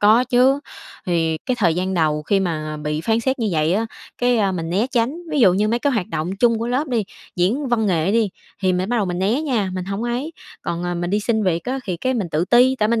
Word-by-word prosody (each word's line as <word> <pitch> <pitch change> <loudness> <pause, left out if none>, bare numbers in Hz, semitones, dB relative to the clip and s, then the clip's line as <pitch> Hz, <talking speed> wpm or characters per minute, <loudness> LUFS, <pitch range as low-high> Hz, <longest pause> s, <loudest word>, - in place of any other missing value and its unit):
có 220 +4 +5
chứ. 255 +2 +3 0.5
Thì 165 -2 +1
cái 255 - +1
thời 170 -6 +3
gian 185 +2 -1
đầu 155 -3 +1
khi 195 +6 +1
mà 155 -4 -2
bị 150 0 -3
phán 225 +7 +1
xét 265 +3 -1
như 225 -3 0
vậy 155 +1 +2
á, 225 +2 0 0.3
cái 245 -1 +2
à, 200 -3 +2
mình 165 -2 -3
né 200 +7 +1
tránh, 250 +4 0
ví 295 - +1
dụ 190 -7 +6
như 210 +3 +1
mấy 235 - +1
cái 280 +2 +1
hoạt 205 -7 -1
động 160 +2 -2
chung 230 +1 +3
của 230 - -2
lớp 265 +5 -1
đi, 230 -5 0 0.3
diễn 240 +11 +1
văn 225 -3 +1
nghệ 175 +1 +1
đi, 225 -2 +2 0.3
thì 185 -1 +3
mình 180 +2 -1
bắt 245 - 0
đầu 210 - +2
mình 180 0 -3
né 210 +9 +1
nha, 230 -10 0
mình 185 - -3
hổng 195 +3 -4
ấy. 245 +7 -2 0.3
Còn, 170 0 -3
à, 175 0 -2
mình 175 +1 -2
đi 205 - +1
xin 220 0 0
việc 170 -3 0
á 260 +2 -2
thì, 185 -4 -3
cái, 255 +9 -1
mình 205 -7 -2
tự 155 +3 +1
ti, 250 +5 +4
tại 215 - +2
mình 230 0 +2
210 Hz, 270 wpm, -21 LUFS, 175-240 Hz, 0.5 s, dụ